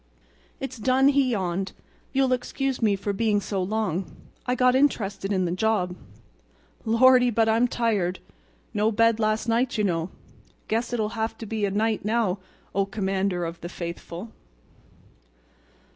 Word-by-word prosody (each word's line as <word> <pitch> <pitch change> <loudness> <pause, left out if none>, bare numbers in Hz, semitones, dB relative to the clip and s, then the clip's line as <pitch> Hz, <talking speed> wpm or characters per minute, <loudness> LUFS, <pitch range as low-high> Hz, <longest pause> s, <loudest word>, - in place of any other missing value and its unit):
"It's 260 -2 -6
done," 260 +4 +4
he 275 -2 +3
yawned. 190 -3 -2 0.4
"You'll 265 -1 +2
excuse 265 +1 -2
me 210 -3 +3
for 200 +1 -3
being 210 0 +2
so 195 -1 -2
long. 195 -2 -1 0.4
I 250 - +2
got 250 0 +4
interested 210 -8 +1
in 185 -2 +1
the 170 - -1
job. 185 -2 0 0.9
Lordy! 250 +2 +5
but 225 -1 +2
I'm 225 +2 +3
tired. 210 -7 0 0.6
No 210 +2 +2
bed 230 +1 +3
last 215 +1 0
night, 235 +2 +1
you 210 - +1
know. 170 -3 0 0.6
Guess 230 +2 -1
it'll 220 -3 0
have 225 0 -3
to 225 - -7
be 220 0 -3
good 200 -1 0
night 220 0 +1
now, 210 -3 +1 0.3
O 195 0 +1
Commander 195 -3 -1
of 165 0 -6
the 175 - -6
Faithful!" 175 +4 -7
215 Hz, 150 wpm, -25 LUFS, 195-235 Hz, 0.9 s, Lordy